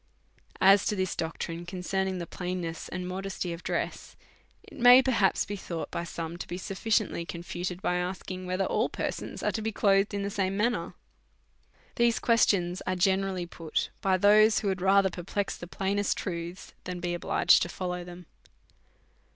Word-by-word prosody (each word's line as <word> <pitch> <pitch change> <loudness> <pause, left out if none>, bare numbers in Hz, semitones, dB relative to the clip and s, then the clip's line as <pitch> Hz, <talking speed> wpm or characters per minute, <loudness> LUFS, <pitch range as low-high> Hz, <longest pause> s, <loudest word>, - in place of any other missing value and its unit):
As 195 +1 +6
to 210 - +1
this 185 -2 -1
doctrine 165 +1 -4
concernino' 185 +1 -2
the 175 - -4
plainness 180 -2 -5
and 180 0 -4
modesty 190 -1 -4
of 170 - -9
dress, - - -3 0.5
it - - -13
may 245 +1 +9
perhaps 230 -7 +2
be 205 - -4
thought 170 -4 -5
by 170 - -3
some 165 0 -5
to - - -7
be 175 - -5
sufficiently 195 -1 -1
confuted 175 +2 -5
by 180 - +1
asking, 185 0 -4
whether 185 +1 0
all - - +1
per - - -2
sons - - -7
are - - +2
to 220 - -3
be 220 +1 -2
clothed 200 0 +2
in 200 - -2
the 200 - -3
same 195 -1 -1
manner? 235 +3 0 1.0
These 235 -1 +3
questions 190 -6 +2
are 185 - +1
generally 190 0 +1
put 165 -2 -3
by 190 -1 +2
those 210 +2 +5
who 205 - 0
had 190 -2 -2
rather 195 0 +4
perplex 190 +3 -3
the 175 - -9
plainest 200 +2 -1
truths 175 0 -5
than 180 -1 -4
be 175 0 -2
obliged 175 - +4
to 175 - -1
follow 180 0 -4
them. 175 0 -11
185 Hz, 175 wpm, -28 LUFS, 175-200 Hz, 1.0 s, may